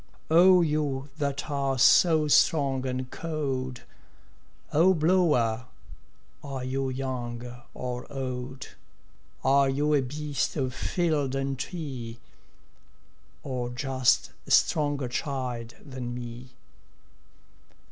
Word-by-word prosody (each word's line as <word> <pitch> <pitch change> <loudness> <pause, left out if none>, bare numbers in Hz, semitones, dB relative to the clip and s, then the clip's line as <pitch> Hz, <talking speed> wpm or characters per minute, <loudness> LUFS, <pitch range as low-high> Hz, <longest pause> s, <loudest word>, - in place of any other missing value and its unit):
O 180 +2 +7
you 150 -3 -1
that 140 -1 -2
are 135 -2 0
so 155 +4 +5
strong 135 -3 +3
and 130 0 -3
cold, 135 -6 -3 0.9
O 180 +5 +5
blower, 150 -9 +2 0.8
are 135 -2 -5
you 135 +1 -1
young 125 -2 -5
or 125 +2 -5
old? 130 -1 -5 0.7
Are 135 +1 +4
you 145 +3 +1
a 145 - +4
beast 145 +2 -2
of 130 -4 -1
field 150 -4 0
and 135 0 -1
tree, 130 -9 -5 1.2
Or 125 -3 -3
just 130 0 +1 0.2
a - - -9
stronger 145 -4 +3
child 125 -3 -4
than 130 -4 -6
me? 120 +1 -8
135 Hz, 100 wpm, -27 LUFS, 125-145 Hz, 1.2 s, O